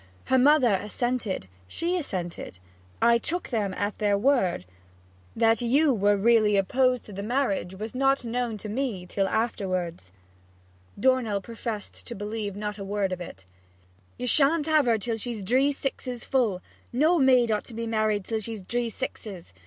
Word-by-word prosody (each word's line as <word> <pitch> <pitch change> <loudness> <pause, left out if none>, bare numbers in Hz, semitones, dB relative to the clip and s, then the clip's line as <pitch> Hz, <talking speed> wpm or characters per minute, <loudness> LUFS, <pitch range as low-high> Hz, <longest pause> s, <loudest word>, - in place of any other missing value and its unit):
Her 260 - +3
mother 265 -4 +5
assented; 225 - -2 0.2
she 340 - -2
assented. 180 - -4 0.5
I 235 0 +5
took 350 +8 -3
them 210 -5 -1
at 205 +1 -3
their 205 -1 +2
word. 200 - +1 0.7
That 225 0 +3
you 275 +5 +3
was 205 -2 +2
really 215 -1 +4
opposed 250 +5 +2
to 210 - -11
the 195 - -5
marriage 205 -5 -1
was 215 +3 -6
not 270 0 +2
known 235 -1 -2
to 210 - -8
me 215 -5 -3
till 195 +2 -1
afterwards.' 185 - -2 0.9
Dornell 255 -6 +2
professed 225 0 -7
to 235 - -6
believe 205 0 -4
not 210 0 -4
a - - -4
word 195 -1 -1
of 180 -1 -4
it. 95 - -9 0.7
'You 250 - -4
sha'n't 290 +4 +4
have 310 -4 +3
her 230 -1 +4
till 225 +2 -3
she's 225 -2 -4
dree 260 +8 +3
sixes 260 -3 -4
full 220 -9 0 0.3
no 315 +7 +3
maid 255 -4 +4
ought 210 - -1
to 230 - -11
be 230 +1 -3
married 215 -3 0
till 225 -1 -2
she's 215 -2 -6
dree 240 +4 -1
sixes! 205 - -7
225 Hz, 165 wpm, -26 LUFS, 200-255 Hz, 0.9 s, mother